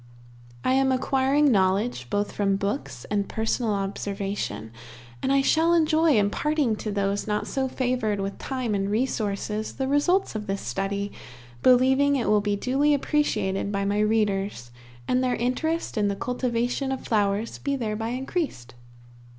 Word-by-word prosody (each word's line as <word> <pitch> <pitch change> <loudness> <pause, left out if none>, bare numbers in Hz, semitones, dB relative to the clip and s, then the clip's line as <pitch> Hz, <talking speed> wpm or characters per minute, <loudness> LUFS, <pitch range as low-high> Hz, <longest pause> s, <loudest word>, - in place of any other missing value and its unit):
I 255 - +2
am 265 0 +3
acquiring 270 +2 +2
knowledge 190 - +1
both 205 0 -1
from 195 -1 +1
books 135 -11 -3
and 205 -1 0
personal 220 0 0
observation, 195 - -3 0.5
and 265 - 0
I 275 0 +4
shall 330 +4 +3
enjoy 315 -3 +3
imparting 240 +5 +1
to 215 - -4
those 200 0 -1
not 210 0 -1
so 265 -1 -1
favored 245 -5 -1
with 195 0 -4
time 255 -5 -2
and 195 0 0
resources 215 -2 -1
the 265 - -2
results 325 +8 +2
of 215 -1 -5
this 195 0 -2
study, 195 +10 -2 0.5
believing 265 +3 +4
it 255 - -1
will 210 -1 +4
be 205 0 0
duly 275 +7 +2
appreciated 235 -10 0
by 200 -1 -1
my 205 +1 0
readers, 205 - 0 0.4
and 255 +1 +2
their 250 -1 +1
interest 255 +3 -1
in 205 - +2
the 200 - -1
cultivation 245 +3 -1
of 265 - -4
flowers 205 0 0
be 280 -1 -1
thereby 225 -3 -2
increased. 255 - -3
220 Hz, 150 wpm, -25 LUFS, 200-265 Hz, 0.5 s, I